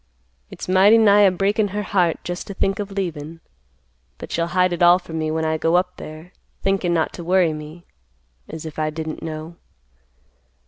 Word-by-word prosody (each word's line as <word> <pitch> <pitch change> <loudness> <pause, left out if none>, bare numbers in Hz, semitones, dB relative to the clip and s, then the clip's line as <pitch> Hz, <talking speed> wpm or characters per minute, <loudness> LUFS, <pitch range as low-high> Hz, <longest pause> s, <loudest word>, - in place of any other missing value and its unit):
It's - - -9
mighty 190 +4 +6
nigh 210 -2 +5
a 195 -2 +6
breakin' 200 +3 +1
her 205 +2 -4
heart 180 -5 +1
just 175 +1 -5
to 200 - -7
think 195 +1 0
of 205 -1 -4
leavin', 165 -5 -5 0.8
but - - -9
she'll 170 0 0
hide 180 -1 +3
it 175 - -4
all 175 +1 +7
from 165 -3 -7
me 155 0 -1
when 160 0 -1
I 160 0 -1
go 165 +2 +1
up 180 0 0
there, 155 +3 -10 0.3
thinkin' 195 -2 +1
not 165 -2 0
to 175 - -8
worry 175 -2 +2
me—as 65 - -12
if 155 -1 -7
I 155 0 0
didn't 155 0 -6
know. 160 +1 -7
170 Hz, 185 wpm, -21 LUFS, 155-190 Hz, 0.8 s, all